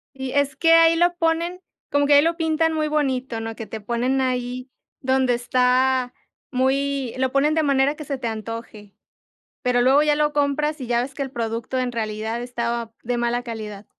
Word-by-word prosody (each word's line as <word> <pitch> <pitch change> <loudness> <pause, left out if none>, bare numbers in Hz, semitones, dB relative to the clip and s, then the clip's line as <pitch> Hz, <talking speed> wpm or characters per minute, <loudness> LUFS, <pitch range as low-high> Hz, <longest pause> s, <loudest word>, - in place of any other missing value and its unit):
Y 265 -1 -5
es 285 -1 +1
que 330 +4 +4
ahí 330 0 +6
lo 350 +1 +2
ponen 340 +2 -1 0.3
como 285 0 +2
que 290 - +5
ahí 285 - +8
lo 330 +2 0
pintan 320 -1 +1
muy 310 -1 0
bonito, 265 -5 -1
¿no?, 225 0 -5
que 225 - -7
te 220 +2 -7
ponen 240 +5 0
ahí 250 0 -2 0.3
donde 260 -1 +2
está 250 +1 +2 0.4
muy 270 0 0
lo 260 0 0
ponen 280 +3 +2
de 320 0 +2
manera 280 0 +2
que 305 - -8
se 275 -1 -3
te 245 - -4
antoje, 220 -2 -7 0.7
pero 250 -1 +2
luego 270 +4 +5
ya 300 -1 +3
lo 300 0 +1
compras 295 +1 0
y 255 - -5
ya 235 0 +1
ves 265 +2 -6
que 280 - -3
el 270 - -4
producto 230 +2 -3
en 250 -1 -1
realidad 220 +1 -3
estaba 235 -2 -3
de 245 +1 -2
mala 240 +1 0
calidad. 215 -4 -7
260 Hz, 195 wpm, -22 LUFS, 235-290 Hz, 0.7 s, ahí